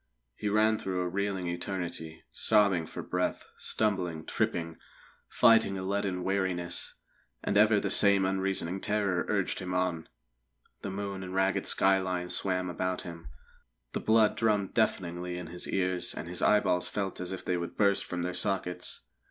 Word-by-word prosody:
He 105 - -2
ran 110 +1 +3
through 95 -1 -2
a 90 - -1
reeling 95 0 -2
eternity, 85 -2 -4
sobbing 100 -6 +3
for - - -7
breath, 90 0 -2
stumbling, 90 -7 -1
tripping, 85 -1 -2 0.5
fighting 115 -4 +4
a 95 - -4
leaden 95 -2 -1
weariness; 95 -3 -1 0.5
and 100 - -1
ever 105 0 +5
the - - -2
same 100 -2 +5
unreasoning 95 -1 -1
terror 100 -4 0
urged 100 -3 0
him 90 -1 -4
on. 90 -3 -1 0.7
The - - -4
moon 100 0 -4
and 95 0 -6
ragged 95 0 +1
skyline 95 -2 +2
swam 90 -1 0
about 95 +1 -2
him; 85 -4 -9 0.7
the - - -1
blood 110 -1 +4
drummed 105 -3 +1
deafeningly 90 -5 0
in 90 - -6
his 90 +2 -5
ears, 90 -2 -1
and - - -6
his 90 +1 -3
eyeballs 90 -4 +3
felt 100 -2 -3
as 90 0 -4
if 95 - -6
they 90 - 0
would 85 0 -5
burst 100 -2 +3
from 90 -1 -4
their 90 0 -2
sockets. 90 -1 -2
95 Hz, 160 wpm, -30 LUFS, 90-100 Hz, 0.7 s, ever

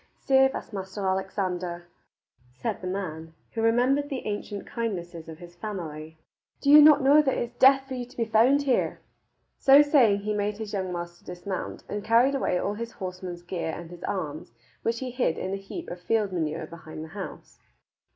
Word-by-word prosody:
"Save 265 0 +3
us, - - -7
Maister 190 0 -5
Alexander," 185 -2 -2 0.7
said 125 - -4
the 185 - -4
man, 165 -4 -5 0.2
who 225 - -3
rememhered 250 +6 +2
the 270 -3 -4
ancient 205 -1 -4
kindnesses 175 -8 -4
of 160 - -8
his 175 0 -13
family, 160 -5 -6 0.4
"do 280 - +2
you 300 +1 +11
not 295 -2 +7
know 285 +3 +7
that 270 -3 0
it 240 - -2
is - - -33
death 270 0 +6
for 265 - -6
you 250 -1 -4
to 250 - -19
be 230 - +1
found 235 +6 +4
here?" 265 -3 +1 0.6
So 275 +2 +8
saying 245 -9 +4
he 210 +1 -2
made 205 0 -1
his 215 -1 -6
young 190 -2 -2
master 175 0 -6
dismount, 180 +2 -5
and 205 0 -4
carried 235 +5 +4
away 260 -9 0
all 200 +3 -1
his 230 +2 -6
horseman's 180 -2 -6
gear 175 -2 -3
and 170 0 -9
his 175 - -11
arms, 155 -9 -4 0.3
which 230 +1 -1
he 255 -1 -4
hid 245 -10 0
in 190 - -3
a - - -1
heap 195 - -8
of 175 - -7
field 210 +1 +1
manure 160 -2 -2
behind 160 -1 -9
the 160 - -9
house. 195 +2 -9
200 Hz, 195 wpm, -27 LUFS, 175-245 Hz, 0.7 s, you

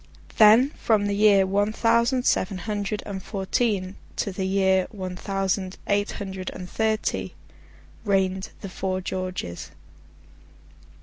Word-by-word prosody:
Then, 225 +6 +7
from 215 -3 +2
the 205 - 0
year 200 -1 +5
one 205 +2 +1
thousand 235 +3 +2
seven 185 +1 +1
hundred 205 +1 -3
and 195 -2 -5
fourteen 195 -1 -1 0.2
to 200 - -2
the 190 0 -3
year 190 -1 +2
one 185 -3 -6
thousand, 195 0 -2
eight 205 0 0
hundred 190 -2 -5
and 180 0 -7
thirty, 220 +2 -1 0.7
reigned 190 -2 0
the 195 - -6
four 185 0 -2
Georges. 185 - -4
195 Hz, 125 wpm, -25 LUFS, 190-210 Hz, 0.7 s, Then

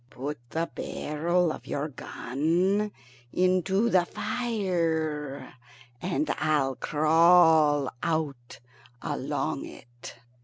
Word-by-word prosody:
"Put 140 +3 -5
the 165 +1 -1
barrel 170 +3 -1
of - - -9
your 145 +2 -2
gun 170 +10 -1 0.4
into 185 +4 +2
the 185 -6 +4
fire, 165 - -2 0.5
and 245 - -1
I'll 145 -4 +1
crawl 155 -2 +4
out 145 -9 -3 0.4
along - - -2
it." 120 0 -12
160 Hz, 85 wpm, -27 LUFS, 150-180 Hz, 0.5 s, the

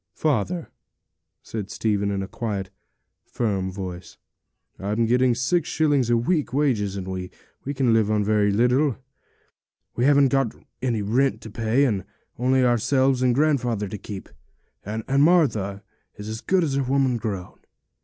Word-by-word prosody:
'Father,' 155 - -1 0.7
said 105 -3 -5
Stephen, 100 -2 0
in 100 -1 -2
a - - -6
quiet 100 -5 -4
and 100 +2 -45
firm 95 -5 -1
voice, 90 -2 -7 0.6
'I'm 105 +4 0
getting 125 +1 +3
six 145 +7 0
shillings 145 -6 +2
a 120 - +4
week 150 +6 0
wages, 120 -9 +1
and 95 -2 -4
we 95 -1 -4 0.5
can 130 -4 +2
live 110 -2 +3
on 105 -1 +2
very 105 -1 +2
little. 125 +5 +2 1.0
We 120 - +1
haven't 140 -1 +5
got 135 -4 0 0.3
any 120 -5 0
rent 130 +7 +1
to 110 - -9
pay, 115 +5 +2
and 100 -8 0 0.4
only 130 +1 +3
ourselves 130 +2 +2
and 125 -2 +3
grandfather 125 -8 +1
to 105 - -5
keep, 100 0 -8 0.6
and 110 +2 -4 0.2
Martha 115 - +2 0.3
is 105 0 -8
as 110 +1 -5
good 185 -2 +2
as 140 -4 -1
a 140 - +1
woman 130 -1 +1
grown. 100 -5 -5
115 Hz, 155 wpm, -24 LUFS, 105-135 Hz, 1.0 s, haven't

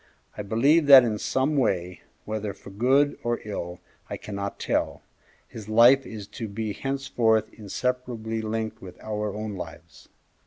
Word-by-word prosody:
I - - -5
believe 140 +10 +3
that 135 -3 +10
in 110 -3 -1
some 135 +6 0
way, 90 -8 0 0.2
whether 105 -2 -4
for 100 - -13
good 135 +8 +2
or 120 0 -1
ill 90 -4 -5 0.3
I - - -4
cannot 100 -1 -6
tell, - - -1 0.4
his 110 -2 -10
life 120 +4 +6
is 105 -2 -7 0.2
to 115 - -2
be 105 +1 -4
henceforth 120 -5 0
inseparably 115 +1 -3
linked 110 0 -4
with 90 -2 -11
our 105 -1 -3
own 105 +1 -5
lives. 80 -6 -10
110 Hz, 150 wpm, -25 LUFS, 100-125 Hz, 0.4 s, that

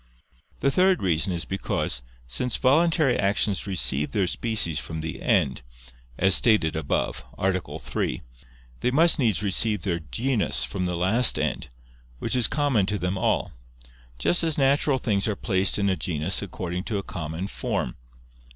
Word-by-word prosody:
The 140 - +2
third 185 - +3
reason 85 0 +1
is 85 -1 -3
because, 95 -9 -1 0.2
since 65 - -2
voluntary 155 0 +3
actions 100 0 0
receive 75 -6 0
their 100 -4 +2
species 100 -5 0
from 80 -1 -6
the 80 0 -6
end, 65 - +1 0.6
as 95 0 +4
stated 95 -5 +4
above 80 -3 -2
(A. 95 0 +1 0.2
3), - - -3 0.6
they - - +1
must 160 +5 +4
needs 110 -6 +1
receive 105 +2 +1
their 85 -4 -1
genus 110 - -1
from 95 -3 -2
the 90 - -2
last 110 +8 +3
end, - - -2 0.5
which - - -2
is 125 -3 +3
common 135 -9 +1
to 105 - -1
them 90 0 -2
all: 95 - 0 0.7
just 175 - +2
as 160 -2 0
natural 140 0 +3
things 105 -5 0
are 105 - -1
placed 95 -2 +2
in 100 -1 +1
a 95 - +2
genus 85 +1 -2
according 90 -2 -5
to 105 - -2
a 100 - -3
common 85 -2 -5
form. 60 -9 -3
100 Hz, 160 wpm, -25 LUFS, 90-125 Hz, 0.7 s, as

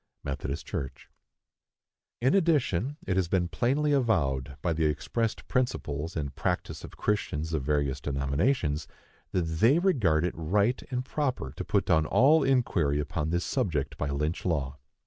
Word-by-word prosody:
(Methodist 70 0 -4
Church.) 65 - -6 1.1
In 130 +3 +3
addition, 145 - +2
it 95 -1 0
has 95 -2 +2
been 90 0 +1
plainly 140 +10 +1
avowed, 70 - +1
by 85 - +1
the 80 0 0
expressed 110 - -2
principles 85 - -1
and 70 -3 -3
practice - - -2
of - - -10
Christians 80 -6 -1
of 80 - 0
various 70 -1 0
denominations, 70 - 0 0.4
that 90 - +1
they 85 - +3
regard 110 - +2
it 90 - -1
right 100 +9 +1
and 125 -1 -2
proper 130 - -2
to - - -4
put - - +1
down 80 -1 +3
all 150 +4 +5
inquiry 95 - +2
upon 75 +1 -2
this 85 +1 0
subject 80 - -1
by 75 - -1
Lynch 75 +4 -2
law. 70 -6 -1
85 Hz, 150 wpm, -28 LUFS, -, 1.1 s, all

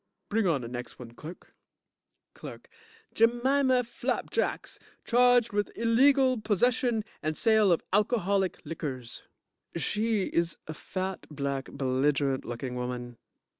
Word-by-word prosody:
Bring 220 -1 +1
on 155 -6 +1
de 120 - -6
next 120 0 -7
one, 120 -2 -10
clerk. 155 +8 -11 0.8
CLERK - - -10 0.4
Jemima 255 +3 +3
Flap 235 - -3
Cakes, - - -2 0.3
charged 245 -1 +4
with 205 0 0
illegal 255 +2 +3
possession 230 +2 +1 0.2
and 155 0 -2
sale 220 -4 +4
of 170 - +2
alcoholic 200 -4 +1
liquors. 140 -6 -6 0.5
JUDGE 170 - -2
(She 215 -1 0
is 170 -1 0
a 155 - -6
fat, 185 +4 -5
black, 140 -2 -3
belligerent 135 0 0
looking 125 +2 -5
woman. 125 -1 -5
190 Hz, 125 wpm, -28 LUFS, 140-230 Hz, 0.8 s, charged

